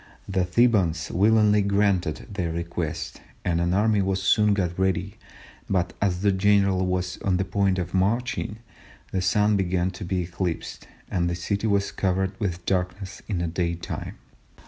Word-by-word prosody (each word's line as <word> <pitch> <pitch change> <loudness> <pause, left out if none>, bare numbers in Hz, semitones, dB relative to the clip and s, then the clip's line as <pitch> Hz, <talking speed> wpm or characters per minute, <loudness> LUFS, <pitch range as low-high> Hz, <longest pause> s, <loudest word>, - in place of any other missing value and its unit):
"The 95 -2 0
Thebans 90 -6 +2
willingly 105 +1 +4
granted 100 -5 +1
their 90 -4 -2
request, 85 -1 -4 0.2
and 85 -1 +1
an 85 0 +1
army 105 +2 +3
was 95 0 0
soon 105 +2 +3
got 90 -2 -2
ready, 95 +2 0 0.5
but 90 -2 0
as 95 -3 +1
the 100 - +4
general 100 -1 +3
was 90 0 -2
on 95 -2 +1
the 95 - 0
point 100 -1 +1
of 90 -1 -3
marching, 110 +3 0 0.5
the 95 - 0
Sun 105 +3 +3
began 95 -1 0
to 90 - -8
be 90 0 -1
eclipsed, 85 0 -4 0.2
and 85 -1 +1
the 85 - -1
city 100 +5 -2
was 100 -1 +1
covered 95 0 0
with 90 -5 -3
darkness 95 +1 -2
in 100 - -2
the 85 0 -1
day 85 +1 -1
time." 85 - -6
95 Hz, 165 wpm, -25 LUFS, 90-100 Hz, 0.5 s, willingly